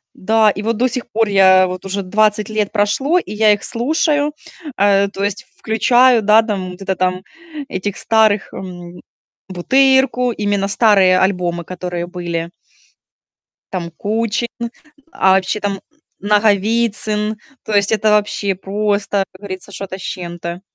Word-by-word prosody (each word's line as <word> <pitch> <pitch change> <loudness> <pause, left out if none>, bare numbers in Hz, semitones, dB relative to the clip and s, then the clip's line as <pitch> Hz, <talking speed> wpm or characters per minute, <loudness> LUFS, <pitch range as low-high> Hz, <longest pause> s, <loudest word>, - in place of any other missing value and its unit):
Да. 220 +2 +3
И 205 - -3
вот, 225 0 -1
до 250 +3 +2
сих 245 0 -4
пор, 225 0 +1
я 190 -1 +5
вот 185 +1 -7
уже 195 +1 -3
20 210 +2 +1
лет 215 -2 -1
прошло, 245 - +1
и 210 - -8
я 215 0 +4
их 205 - 0
слушаю. 295 +4 0 0.4
Э, 200 0 +3
то 195 0 -5
есть 205 0 -3
включаю, 240 +2 +3
да, 215 +2 +5
там, 190 -5 -4
где-то 190 0 -3
там, 185 0 -1 0.4
этих 195 -3 -4
старых, 215 -2 +2
м, 175 -2 -9 0.5
"Бутырку", 255 +5 +2
именно 205 -3 -1
старые 195 -3 +4
альбомы, 180 -3 0
которые 175 -1 -5
были. 170 -2 -4 1.2
Там, 175 -3 -4
Кучин, 220 +6 -2 0.6
а 190 - +2
вообще, 190 +2 0
там, 205 0 -2
м, 195 - -7 0.4
Наговицын. 210 +1 +1 0.3
То 215 - -3
есть 200 0 +2
это, 215 0 +2
вообще, 205 -1 0
просто, 200 +1 -1
как 185 - -17
говорится, 195 -1 -8
что-то 190 0 -6
с - - -12
чем-то. 175 -1 -6
205 Hz, 145 wpm, -17 LUFS, 185-220 Hz, 1.2 s, я